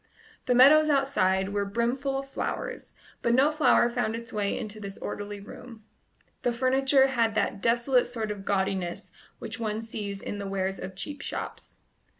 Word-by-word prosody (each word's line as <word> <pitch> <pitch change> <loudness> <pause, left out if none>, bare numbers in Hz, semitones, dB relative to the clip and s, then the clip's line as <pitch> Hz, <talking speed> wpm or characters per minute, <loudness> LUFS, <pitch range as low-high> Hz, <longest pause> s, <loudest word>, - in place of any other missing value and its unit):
The 250 - +3
meadows 305 +5 +7
outside 195 -10 +2
were 205 0 -1
brimful 240 +6 -1
of 270 0 -5
flowers, 270 - -5 0.3
but 235 0 +2
no 275 +4 +4
flower 300 -5 +4
found 235 -2 -1
its 230 0 -8
way 205 -1 -1
into 215 0 -5
this 200 -1 -7
orderly 205 0 -5
room. 220 +2 -11 0.6
The 245 - +1
furniture 265 +2 +3
had 230 -5 +1
that 200 - 0
desolate 240 +2 +2
sort 225 -3 -3
of 200 -2 -6
gaudiness 190 -3 -2 0.3
which 245 - -6
one 220 -1 -2
sees 205 -3 -5
in 205 - -5
the 200 - -4
wares 195 0 -2
of 185 +1 -7
cheap 290 +9 -5
shops. - - -6
230 Hz, 165 wpm, -27 LUFS, 200-260 Hz, 0.6 s, meadows